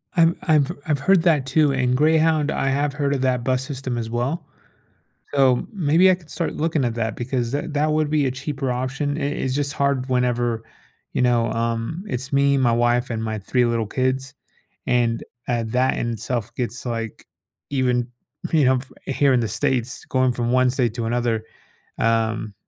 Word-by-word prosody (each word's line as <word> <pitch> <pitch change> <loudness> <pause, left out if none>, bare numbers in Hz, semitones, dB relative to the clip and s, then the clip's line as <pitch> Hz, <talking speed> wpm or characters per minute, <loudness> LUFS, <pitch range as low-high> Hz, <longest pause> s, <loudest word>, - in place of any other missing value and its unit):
I've 170 -1 +4
I've 150 -4 +3 0.2
I've 145 -3 +1
heard 190 +2 +3
that 155 -6 +3
too. 150 +1 +3
And 125 -2 +1
Greyhound, 155 +1 +3
I 135 - -1
have 140 +1 0
heard 140 -1 0
of 135 - -1
that 125 -2 +1
bus 130 0 0
system 130 -3 -4
as 115 -1 -3
well. 135 +7 -2 0.9
So, 130 -3 +3
maybe 180 -1 +4
I - - +3
could 170 -3 -20
start 170 - -3
looking 155 -2 0
at 120 -2 -1
that 110 -1 -2
because 120 -1 -2
that 145 +2 -3
that 150 +1 +1
would 155 -1 +1
be 150 -2 +2
a 130 - +1
cheaper 135 0 -3
option. 135 +4 -2
I - - -4
It's 135 -2 -2
just 145 -1 -1
hard 140 -2 0
whenever, 120 -2 0 0.5
you - - 0
know, 120 -2 +2
um, 115 - -2
it's 130 +2 -4
me, 140 0 +4
my 125 -3 +3
wife, 120 +1 +2
and 110 -2 -3
my 110 -1 -3
3 125 +5 +1
little 115 -1 0
kids. 130 +2 -1 0.5
And, 120 -2 +1 0.3
uh, 120 -2 +1
that 125 +3 +1
in 120 - -1
itself 115 +1 -3
gets, 120 -1 -4
like, 115 -2 -4 0.4
even, 125 -3 +1 0.4
you 155 -3 +4
know, 130 0 +4 0.3
here 140 0 +2
in 125 - +4
the 115 - 0
States 125 +2 -1
going 130 -1 +2
from 120 0 -2
1 130 0 +4
state 125 -4 0
to 115 -2 -3
another, 115 -2 0 0.5
um, 110 -2 0
130 Hz, 190 wpm, -22 LUFS, 120-145 Hz, 0.9 s, I've